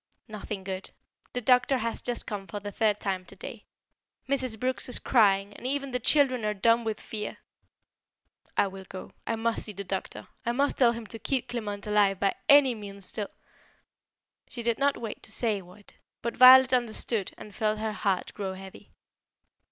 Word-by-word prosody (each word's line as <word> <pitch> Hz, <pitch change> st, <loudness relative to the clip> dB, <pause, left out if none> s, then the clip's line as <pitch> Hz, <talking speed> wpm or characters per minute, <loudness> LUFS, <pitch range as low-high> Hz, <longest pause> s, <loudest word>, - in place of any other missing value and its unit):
"Nothing 210 Hz, -2 st, -6 dB
good. 190 Hz, 0 st, -5 dB, 0.4 s
The 250 Hz, -, -2 dB
doctor 250 Hz, +2 st, +4 dB
has 230 Hz, -1 st, -2 dB
just 245 Hz, -1 st, -2 dB
come 200 Hz, -2 st, -5 dB
for 205 Hz, -, -5 dB
the 205 Hz, 0 st, -6 dB
third 210 Hz, -1 st, +1 dB
time 190 Hz, -2 st, -2 dB
today. -, -, -9 dB, 0.6 s
Mrs. 260 Hz, -5 st, 0 dB
Brooks 255 Hz, +1 st, -1 dB
is 250 Hz, -, +1 dB
crying 200 Hz, -4 st, +3 dB
and 250 Hz, -, -6 dB
even 275 Hz, 0 st, -1 dB
the 250 Hz, -, -1 dB
children 255 Hz, -2 st, +3 dB
are 210 Hz, 0 st, 0 dB
dumb 230 Hz, +4 st, +3 dB
with 220 Hz, -1 st, -3 dB
fear." 210 Hz, -1 st, -5 dB, 1.2 s
"I -, -, +5 dB
will 190 Hz, -1 st, -8 dB
go. 185 Hz, -, -8 dB, 0.2 s
I 230 Hz, -, 0 dB
must 225 Hz, 0 st, 0 dB
see 210 Hz, -, -7 dB
the 200 Hz, +1 st, -5 dB
doctor. 190 Hz, 0 st, -5 dB, 0.2 s
I 235 Hz, -, 0 dB
must 280 Hz, +3 st, 0 dB
tell 240 Hz, -3 st, +5 dB
him 230 Hz, -1 st, -7 dB
to 225 Hz, +1 st, -6 dB
keep 250 Hz, +4 st, -1 dB
Clement 210 Hz, -4 st, -4 dB
alive 205 Hz, -2 st, +3 dB
by 195 Hz, -, +2 dB, 0.2 s
any 280 Hz, -3 st, +7 dB
means 200 Hz, -3 st, -8 dB
till 210 Hz, -2 st, -4 dB, 0.6 s
" -, -, -46 dB
She 240 Hz, -, -6 dB
did 235 Hz, -1 st, 0 dB
not 280 Hz, 0 st, +2 dB
wait 225 Hz, -3 st, -6 dB
to -, -, -7 dB
say 220 Hz, -3 st, +1 dB
what; 185 Hz, +3 st, -17 dB, 0.3 s
but 235 Hz, 0 st, -2 dB
Violet 260 Hz, 0 st, +9 dB
understood 230 Hz, -4 st, 0 dB
and 210 Hz, -, -11 dB
felt 215 Hz, -1 st, 0 dB
her 215 Hz, 0 st, -2 dB
heart 195 Hz, -3 st, -1 dB
grow 195 Hz, -2 st, -4 dB
heavy. 190 Hz, 0 st, -12 dB
220 Hz, 185 wpm, -28 LUFS, 200-245 Hz, 1.2 s, Violet